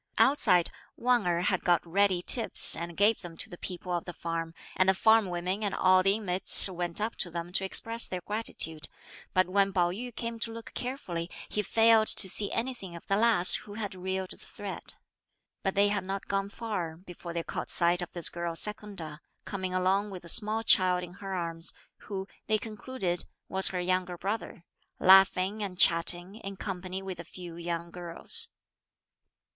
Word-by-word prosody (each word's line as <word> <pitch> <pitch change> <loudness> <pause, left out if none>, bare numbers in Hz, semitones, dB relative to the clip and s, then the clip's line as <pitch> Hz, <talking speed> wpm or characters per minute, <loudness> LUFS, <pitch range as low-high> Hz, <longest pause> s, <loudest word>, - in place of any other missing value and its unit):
Outside, 180 -11 +4 0.3
Wang 245 -5 +1
Erh 170 0 +1
had 185 0 0
got 175 -2 +2
ready 185 +1 +1
tips 230 +3 +5
and 170 0 -7
gave 210 +2 +3
them 170 -3 -10
to 220 - -4
the 175 - -9
people 180 0 -7
of 175 -1 -2
the 175 - -7
farm, 165 0 -5 0.2
and 185 0 +3
the 190 - +3
farm 220 +1 +4
women 180 +3 -3
and 205 - -1
all 185 0 +4
the 195 +1 +3
inmates 195 -3 +7
went 175 -1 -2
up 220 +2 -2
to 175 - -1
them 170 +1 -6
to 190 - +2
express 230 +4 +1
their 180 -1 -5
gratitude; 175 -7 -2 0.5
but 185 0 +3
when 195 +1 +2
Pao 175 -2 +1
yü 240 +5 -7
came 230 -1 -5
to 230 - +1
look 230 0 -10
carefully, 180 -10 -5 0.2
he 210 - -1
failed 225 +1 +4
to 190 - +5
see 205 +2 -3
anything 230 -7 -4
of 170 - -11
the 195 - 0
lass 215 -4 +6
who 205 - -1
had 210 -3 -5
reeled 190 0 -4
the - - -10
thread. - - -5 0.7
But 195 - -2
they 200 +1 +4
had 205 -2 -1
not 195 +1 -5
gone 195 0 -2
far 200 -8 -5
before 175 -1 -10
they 170 -1 -3
caught - - -5
sight 175 +1 +3
of 175 - -6
this 175 -2 +4
girl 170 -1 -5
Secunda 195 -6 -4 0.2
coming 185 -2 -4
along 190 +3 +1
with 185 -3 -9
a - - -3
small 215 +5 +1
child 180 -4 +3
in 175 0 -9
her 195 0 -6
arms, 165 -1 -4 0.3
who, 195 -2 -5 0.2
they 215 - +2
concluded, 215 -4 -4 0.2
was 190 0 +2
her 180 - -2
young 185 +1 0
brother, 185 +1 -5 0.4
laughing 190 +2 +5
and 190 -3 -5
chatting, 175 +3 +2
in 195 -3 -8
company 185 -1 -5
with 190 -2 -7
a - - -6
few 175 0 -10
young 170 0 -5
girls. 180 - -2
185 Hz, 190 wpm, -28 LUFS, 175-210 Hz, 0.7 s, inmates